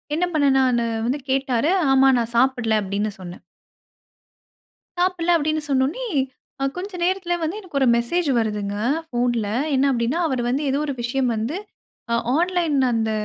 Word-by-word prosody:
என்ன 355 Hz, -, +1 dB
பண்ணனா 275 Hz, -3 st, +3 dB
நானு 235 Hz, -, 0 dB, 0.2 s
வந்து 275 Hz, +4 st, -1 dB
கேட்டாரு. 270 Hz, +3 st, +1 dB, 0.2 s
ஆமா 270 Hz, 0 st, +5 dB
நான் 235 Hz, 0 st, -3 dB
சாப்பிடல 245 Hz, -4 st, +2 dB
அப்டின்னு 200 Hz, +2 st, -2 dB
சொன்னேன். 180 Hz, -1 st, -9 dB, 1.6 s
சாப்பிடல 355 Hz, -1 st, +1 dB
அப்டின்னு 310 Hz, +1 st, -1 dB
சொன்னோனே, 275 Hz, -, 0 dB, 0.6 s
அ -, -, +1 dB
கொஞ்ச 375 Hz, +3 st, -5 dB
நேரத்தில 365 Hz, -1 st, 0 dB
வந்து 325 Hz, +6 st, -2 dB
எனக்கு 335 Hz, -9 st, -4 dB
ஒரு 265 Hz, -, +3 dB
மெசேஜ் 285 Hz, +7 st, 0 dB
வருதுங்க. 210 Hz, -3 st, -1 dB, 0.3 s
ஃபோன்ல. 240 Hz, -4 st, 0 dB, 0.3 s
என்ன 265 Hz, +1 st, +3 dB
அப்டின்னா, 245 Hz, +5 st, 0 dB
அவர் 260 Hz, -4 st, -1 dB
வந்து 275 Hz, +4 st, 0 dB
ஏதோ 275 Hz, +2 st, 0 dB
ஒரு 280 Hz, -, -2 dB
விஷயம் 250 Hz, +1 st, 0 dB
வந்து 235 Hz, -, -2 dB, 0.6 s
அ -, -, +3 dB, 0.2 s
ஆன்லைன் 345 Hz, -3 st, +1 dB, 0.2 s
அந்த 225 Hz, -1 st, 0 dB
270 Hz, 150 wpm, -22 LUFS, 235-325 Hz, 1.6 s, ஆமா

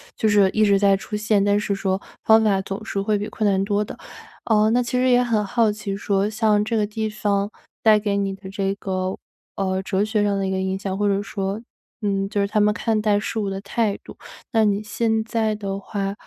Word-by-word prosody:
就 220 Hz, -, +1 dB
是 205 Hz, -2 st, +5 dB
一 215 Hz, -, +2 dB
直 200 Hz, -1 st, +4 dB
在 200 Hz, 0 st, +4 dB
出 195 Hz, +2 st, -6 dB
现， 210 Hz, -1 st, +2 dB
但 205 Hz, 0 st, +3 dB
是 210 Hz, -1 st, -1 dB
说 195 Hz, -1 st, -1 dB, 0.2 s
方 220 Hz, 0 st, +6 dB
法 195 Hz, -3 st, +2 dB
总 195 Hz, +3 st, -6 dB
是 200 Hz, -, -2 dB
会 210 Hz, +1 st, +1 dB
比 205 Hz, -, -4 dB
困 215 Hz, -2 st, 0 dB
难 195 Hz, 0 st, +2 dB
多 205 Hz, 0 st, +1 dB
的。 -, -, -9 dB, 0.5 s
呃， 215 Hz, -2 st, +3 dB
那 245 Hz, +2 st, +2 dB
其 235 Hz, -, -6 dB
实 255 Hz, -, +3 dB
也 245 Hz, 0 st, +5 dB
很 220 Hz, -3 st, +1 dB
好 220 Hz, +2 st, +2 dB
奇 205 Hz, -2 st, -4 dB
说 200 Hz, 0 st, 0 dB
像 215 Hz, -1 st, +2 dB
这 225 Hz, +2 st, -1 dB
个 210 Hz, -, +2 dB
地 215 Hz, +1 st, -3 dB
方 205 Hz, -1 st, -1 dB, 0.3 s
带 220 Hz, -1 st, +6 dB
给 205 Hz, -1 st, -1 dB
你 195 Hz, -1 st, -1 dB
的 195 Hz, 0 st, -11 dB
这 195 Hz, 0 st, -1 dB
个， 185 Hz, -1 st, -3 dB, 0.4 s
呃， 190 Hz, -1 st, -1 dB
哲 195 Hz, +1 st, 0 dB
学 215 Hz, -1 st, 0 dB
上 200 Hz, -1 st, +1 dB
的 195 Hz, -, -1 dB
一 -, -, -2 dB
个 190 Hz, -, -1 dB
影 190 Hz, 0 st, -1 dB
响 190 Hz, -1 st, -4 dB
或 205 Hz, 0 st, +1 dB
者 200 Hz, 0 st, +1 dB
说， 195 Hz, +1 st, -3 dB, 0.4 s
嗯， 195 Hz, -1 st, 0 dB
就 205 Hz, -, -1 dB
是 -, -, +2 dB
他 210 Hz, +1 st, 0 dB
们 210 Hz, -, +4 dB
看 220 Hz, 0 st, 0 dB
待 210 Hz, -1 st, +2 dB
事 220 Hz, +1 st, -3 dB
物 200 Hz, -2 st, -1 dB
的 195 Hz, -, -4 dB
态 210 Hz, 0 st, -1 dB
度。 -, -, -11 dB, 0.4 s
那 225 Hz, -1 st, +3 dB
你 205 Hz, 0 st, +1 dB
现 220 Hz, +1 st, 0 dB
在 220 Hz, -1 st, 0 dB
的 195 Hz, -1 st, -4 dB
话， 195 Hz, 0 st, -3 dB
205 Hz, 260 characters per minute, -22 LUFS, 195-215 Hz, 0.5 s, 方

